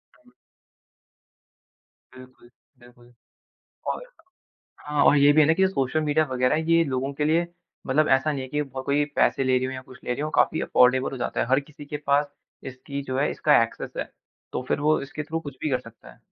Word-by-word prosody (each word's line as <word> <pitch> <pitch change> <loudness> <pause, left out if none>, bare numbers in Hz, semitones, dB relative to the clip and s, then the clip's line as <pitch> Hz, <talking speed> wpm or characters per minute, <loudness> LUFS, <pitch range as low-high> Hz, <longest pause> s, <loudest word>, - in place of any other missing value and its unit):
हुँ। - - -25 1.8
बिल्कुल, 130 -1 -16 0.3
बिल्कुल। 120 0 -19 0.8
और - - -2 0.8
हाँ, 150 -1 0
और - - +6
ये 145 0 +6
भी 155 - +4
है 150 - +6
ना 160 - +4
कि 190 +3 +3
सोशल 150 -3 -1
मीडिया 155 +1 +2
वगैरह 125 +1 +2
ये 165 0 +5
लोगों 135 -1 -2
के 150 - -1
लिए 165 +3 +2 0.4
मतलब 150 +3 +2
ऐसा 135 +3 +3
नहीं 140 -2 -4
है 130 - -7
कि 150 +3 -2 0.2
कोई 145 +2 +1
पैसे 135 - +2
ले 130 0 +2
रही 130 0 0
हो 130 - -5
या 130 0 -7
कुछ 130 - -15
ले - - -1
रही 125 - -4
हो। 155 - -2
काफ़ी 160 - +2
अफोर्डेबल 130 +1 +3
हो 135 - -6
जाता 125 - -3
है। - - 0
हर 135 +2 +3
किसी 145 +1 -13
के 150 - -4
पास 145 +1 +1 0.4
इसकी 140 +2 -7
जो 130 -1 -4
है, 145 - +1
इसका 150 -6 +3
एक्सेस 115 - -5
है - - -4 0.4
तो - - -3
फिर - - 0
वो 155 +1 +2
इसके 140 +2 -6
थ्रू 160 +2 -4
कुछ 145 -4 -9
भी 155 - -1
कर 130 -2 0
सकता 115 -3 -15
है। - - -23
140 Hz, 215 wpm, -25 LUFS, 130-150 Hz, 1.8 s, और